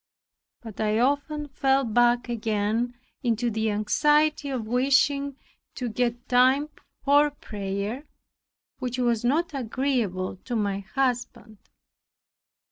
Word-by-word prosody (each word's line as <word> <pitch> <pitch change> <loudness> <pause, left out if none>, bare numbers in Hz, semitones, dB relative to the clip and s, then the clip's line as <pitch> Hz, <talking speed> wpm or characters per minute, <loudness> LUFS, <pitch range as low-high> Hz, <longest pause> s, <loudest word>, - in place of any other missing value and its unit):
But 220 -3 -7
I 215 0 +1
often 285 +4 0
fell 270 0 +2
back 240 +1 +2
again 225 +1 -1 0.3
into 235 -1 0
the 220 0 0
anxiety 295 +8 +2
of 255 -5 -3
wishing 275 +3 +2 0.4
to 250 -3 -3
get 240 +1 -2
time 260 +4 +4 0.3
for 290 +1 +5
prayer, 205 0 -5 0.7
which 250 0 -3
was 240 -3 +1
not 305 +7 +1
agreeable 235 -8 -1
to 240 +6 -5
my 200 -3 0
husband. 240 0 -3
245 Hz, 110 wpm, -26 LUFS, 220-275 Hz, 0.7 s, for